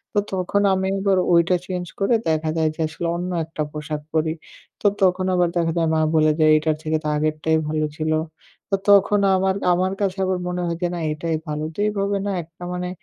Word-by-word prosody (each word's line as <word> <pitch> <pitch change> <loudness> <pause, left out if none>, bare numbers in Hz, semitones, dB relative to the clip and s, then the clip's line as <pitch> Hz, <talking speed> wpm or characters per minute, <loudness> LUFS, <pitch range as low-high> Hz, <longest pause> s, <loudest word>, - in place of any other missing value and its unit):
তো - - +5
তখন 190 +2 0
আমি 190 0 0
আবার 195 -1 +2 0.2
ঐটা 170 +2 +4
চেঞ্জ 180 -1 -4
করে 200 +4 +3
দেখা 155 0 0
যায় 160 -1 +2
যে - - -25
আসলে 170 +2 -4
অন্য 180 +1 -3
একটা 160 -1 -6
পোশাক 150 0 -5
পরি। 160 0 +1 0.5
তো - - -14 0.2
তখন 185 0 +3
আবার 175 -1 +3
দেখা 165 -1 +1
যায় 165 -1 +2
মা 160 - +2 0.2
বলে 155 0 +4
যে, 155 - +4
"এইটার 155 0 +1
থেকে 155 0 0
তো - - -2
আগেরটাই 155 +1 +1
ভালো 155 0 0
ছিল।" 155 0 -1 0.6
তো 195 - +2
তখন 200 +1 +5 0.2
আমার 190 0 +1 0.2
আমার 185 +2 0
কাছে 195 -1 0
আবার 185 -1 0
মনে 180 0 -2
হয় 170 -1 -2
যে 175 - +2
না 175 - -4
এটাই 160 +1 -2
ভালো। 150 0 -3
তো - - -10
এইভাবে 200 -1 -1
না 200 - 0
একটা 170 +2 -15
মানে 180 0 -3
170 Hz, 210 wpm, -22 LUFS, 155-190 Hz, 0.6 s, তো